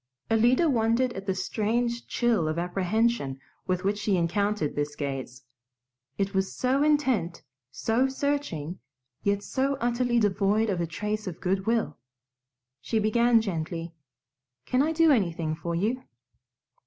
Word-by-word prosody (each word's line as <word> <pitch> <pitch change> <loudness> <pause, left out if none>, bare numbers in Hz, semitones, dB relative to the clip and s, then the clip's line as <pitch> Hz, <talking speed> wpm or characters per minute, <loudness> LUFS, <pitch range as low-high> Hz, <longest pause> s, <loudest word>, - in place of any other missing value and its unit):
Alida 240 +8 +4
wondered 240 -1 +2
at 195 -2 -7
the 190 - +1
strange 235 +5 -1
chill 230 -9 +1
of 155 +1 -2
apprehension 180 - 0 0.3
with 185 0 0
which 205 +2 0
she 205 -2 +1
encountered 195 0 0
this 145 0 -2
gaze. 135 -3 -5 0.7
It 195 0 -1
was 190 0 0
so 260 +2 +1
intent, 260 - +1 0.3
so 230 - +1
searching, 265 - -2 0.4
yet 200 0 0
so 275 +1 0
utterly 240 0 +1
devoid 205 +1 +2
of 180 -3 -1
a 170 - -1
trace 210 +5 -3
of 175 - -5
good 190 +2 -1
will. 225 -10 0 0.8
She 225 - -1
began 230 +2 +4
gently, 165 -4 -4 0.7
"Can 255 - +2
I 310 +3 +2
do 325 0 +4
anything 170 - +1
for 170 +1 -4
you?" 220 +9 0
210 Hz, 140 wpm, -27 LUFS, 175-240 Hz, 0.8 s, Alida